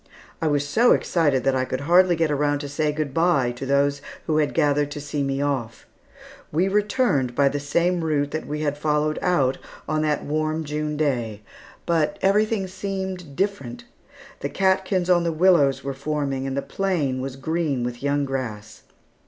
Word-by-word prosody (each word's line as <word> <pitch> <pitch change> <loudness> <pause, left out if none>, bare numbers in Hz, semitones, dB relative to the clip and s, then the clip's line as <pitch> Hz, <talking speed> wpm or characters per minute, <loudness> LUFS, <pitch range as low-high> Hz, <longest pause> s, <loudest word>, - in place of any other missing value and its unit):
I 160 - +1
was 145 -1 +1
so 235 +11 +4
excited 145 -7 +1
that 135 -1 +2
I 130 - +1
could 130 +1 -3
hardly 175 +4 +4
get 160 -2 +1
around 145 0 +1
to 145 - -5
say 150 +2 0
good 150 -2 -3
bye 165 -7 +2
to 125 +2 -7
those 140 +1 +2 0.2
who 155 - +1
had 150 -2 +1
gathered 145 0 +2
to 145 - -6
see 145 0 -3
me 135 0 -1
off. 125 -6 -3 0.7
We 170 +5 +2
returned 205 - +1
by 140 -1 +4
the 145 - -3
same 170 +5 0
route 145 -2 0
that 155 - -4
we 150 +1 -3
had 145 -1 -1
followed 150 0 0
out 140 -8 +1 0.3
on 155 0 0
that 150 -1 0
warm 155 +2 -1
June 150 0 -3
day, 120 -8 -1 0.4
but 170 +3 +1
everything 210 +1 +2
seemed 190 -4 -5
different. 195 -11 -2 0.6
The - - -3
catkins 190 -1 +1
on 175 -2 +4
the 170 - 0
willows 160 -5 +3
were 140 0 -3
forming 140 -1 -2
and 135 0 -3
the 140 - -1
plain 155 -10 -1
was 135 0 -5
green 145 -2 -1
with 120 0 -4
young 140 0 0
grass. 125 -6 -5
150 Hz, 180 wpm, -23 LUFS, 140-170 Hz, 0.7 s, so